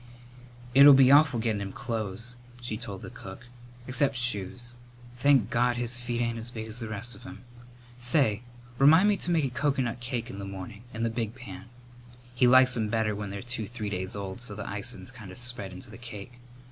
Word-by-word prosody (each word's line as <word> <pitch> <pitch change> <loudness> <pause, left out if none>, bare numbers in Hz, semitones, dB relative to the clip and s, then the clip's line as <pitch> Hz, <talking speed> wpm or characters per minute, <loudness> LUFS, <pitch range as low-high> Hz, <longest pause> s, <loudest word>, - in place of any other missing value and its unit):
"It'll 140 +1 +10
be 135 -1 +7
awful 145 -4 +6
gettin' 110 -3 0
him 100 -1 -4
clothes," 115 -1 -3 0.2
she 120 -3 -4
told 105 -4 -7
the - - -8
cook; 95 +3 -10 0.4
"except 135 +2 +1
shoes. 120 0 -1 0.4
Thank 125 -3 +3
God, 120 +1 +2
his 120 0 -1
feet 120 -1 -3
ain't 115 -1 -1
as 115 +1 -6
big 110 -3 -6
as 110 +2 -8
the 115 -2 -5
rest 110 +3 -5
of - - -9
him! 130 - -11 0.6
Say, 120 -3 +3 0.4
remind 160 +9 +7
me 205 - +2
to 175 - -3
make 165 -4 +2
a 130 - -2
coconut 130 -3 0
cake 120 -1 -4
in 100 - -8
the - - -5
morning 100 +3 -8
in 115 - -4
the 115 - +1
big 115 -1 -3
pan. 100 -8 -9 0.7
He 125 0 +4
likes 130 0 +6
'em 110 -3 0
better 110 -1 0
when 105 0 -5
they're 100 +2 -6
two 120 -3 -3
three 110 -3 -5
days 95 0 -3
old 100 +2 -5
so 115 -5 -6
the 105 - -5
icin's 115 +5 -4
kind 110 -6 -11
of 90 - -9
spread 120 -6 -2
into 95 +6 -10
the 115 - -11
cake. 120 0 -9
120 Hz, 210 wpm, -28 LUFS, 105-125 Hz, 0.7 s, It'll